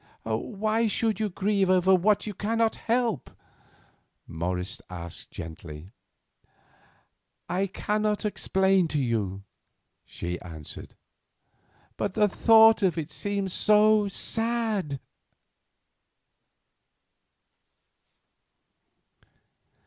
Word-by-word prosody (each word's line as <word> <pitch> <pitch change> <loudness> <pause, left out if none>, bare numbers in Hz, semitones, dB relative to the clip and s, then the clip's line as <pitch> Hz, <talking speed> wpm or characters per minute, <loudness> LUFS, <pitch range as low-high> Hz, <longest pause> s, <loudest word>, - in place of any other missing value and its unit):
"Why 215 - -1
should 220 0 0
you 215 -1 0
grieve 195 0 0
over 185 0 +4
what 200 +3 +3
you 210 - -4
cannot 225 +3 0
help?" 230 - -1
asked - - -28 0.9
Morris 90 +6 -3 0.5
gently. 80 +1 -9 1.6
"I 190 +3 0
cannot 210 +2 -1
quite - - -5
explain 190 -3 +2
to 155 -2 -1
you," 105 -7 -2 0.6
she 90 0 -6
answered; 80 -4 -10 1.0
"but 200 -2 -2
the 210 -1 +4
thought 225 +2 +6
of 185 -4 +2
it 160 -1 -4
seems 200 +2 -2
so 210 0 +4
sad." 220 - -2
195 Hz, 85 wpm, -27 LUFS, 135-215 Hz, 1.6 s, thought